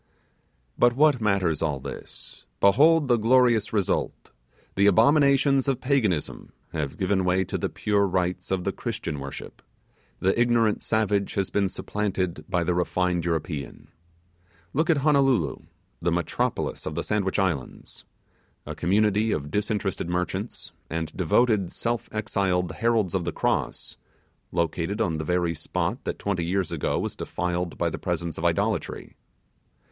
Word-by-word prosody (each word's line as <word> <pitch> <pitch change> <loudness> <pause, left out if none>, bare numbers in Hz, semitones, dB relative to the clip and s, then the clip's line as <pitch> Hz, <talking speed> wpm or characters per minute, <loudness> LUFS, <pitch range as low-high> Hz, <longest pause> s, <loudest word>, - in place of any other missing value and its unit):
But 120 0 +5
what 145 -3 +4
matters 95 -7 +1
all 75 -4 0
this? - - -9
Behold 145 - +5
the 120 -2 +4
glorious 115 -1 +3
result! 100 -4 -1 0.4
The 100 +1 +3
abominations 140 - +4
of 135 -3 +1
Paganism 120 - -1 0.2
have 75 -2 -3
given 95 0 +1
way 90 +1 +2
to - - -6
the - - -1
pure 100 -1 +1
rites 90 -1 -1
of 95 -1 -1
the - - 0
Christian 75 - -4
worship, 70 +1 -8 0.6
the 95 - +2
ignorant 115 -3 +2
savage 105 -3 0
has 100 -2 -1
been 100 -2 +1
supplanted 95 -6 -3
by 85 -1 +1
the 90 +1 0
refined 90 0 0
European! 80 -3 -4 0.8
Look 155 +4 +1
at 165 - +4
Honolulu, 135 - +3 0.4
the - - +1
metropolis - - -2
of 75 - -4
the 85 - -2
Sandwich 100 -3 -1
Islands! 90 -9 -3 0.6
A - - -5
community 105 +3 +2
of 75 -4 -3
disinterested 105 -3 -1
merchants, 90 +5 -3 0.2
and 80 0 -4
devoted 100 +2 +2
self 120 -1 -3
exiled 95 -4 0
heralds 115 -5 +1
of 95 -2 0
the 85 - -2
Cross, - - -2 0.5
located 85 +4 -1
on 85 -8 0
the - - -2
very 90 -1 +1
spot 75 - -3
that - - -3
twenty 95 -4 -2
years 90 +1 -1
ago - - -1
was - - -3
defiled 90 0 -3
by - - 0
the - - -5
presence 85 -2 -3
of - - -6
idolatry. - - -1
95 Hz, 145 wpm, -25 LUFS, 85-110 Hz, 0.8 s, But